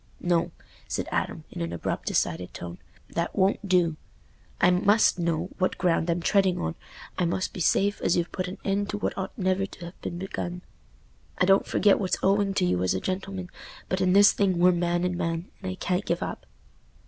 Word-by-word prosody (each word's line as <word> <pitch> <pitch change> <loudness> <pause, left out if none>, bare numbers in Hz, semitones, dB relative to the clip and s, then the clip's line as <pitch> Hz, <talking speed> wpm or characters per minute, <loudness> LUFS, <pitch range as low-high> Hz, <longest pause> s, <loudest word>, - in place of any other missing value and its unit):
"No," 175 -1 +1 0.4
said - - -3
Adam, - - -2
in - - -6
an 85 0 -2
abrupt 85 - -3
decided 85 +1 -1
tone, 85 -1 -7 0.3
"that 170 - -2
won't 195 +1 +1
do. 170 -4 +3 0.6
I - - +5
must 200 +2 +4
know 170 +1 -1
what 185 - +1
ground 175 -1 +1
I'm 170 +1 +1
treading 195 -2 +3
on. 80 0 -2 0.5
I 180 - +2
must 180 +2 -1
be - - -6
safe 200 +4 +2
as 175 - +2
you've 175 0 -1
put 185 0 -3
an 185 - -6
end 200 +1 0
to 205 - -2
what - - -2
ought 190 0 -5
never 190 0 +1
to 170 -3 -9
ha' - - -32
been 170 - -4
begun. 180 -1 -5 0.7
I 180 - +3
don't 195 +1 +4
forget 205 -2 +4
what's 190 -3 0
owing 195 0 +2
to - - +2
you 90 0 +1
as 95 +1 +1
a - - 0
gentleman, 185 - -4 0.4
but 185 +1 0
in 185 -1 +3
this 200 +1 +8
thing 190 -3 +1
we're 180 +1 +6
man 175 0 0
and 180 0 0
man, 165 0 -3
and 185 -1 -3
I - - -5
can't 185 +1 -1
give - - -1
up." - - -6
180 Hz, 205 wpm, -26 LUFS, 170-195 Hz, 0.7 s, this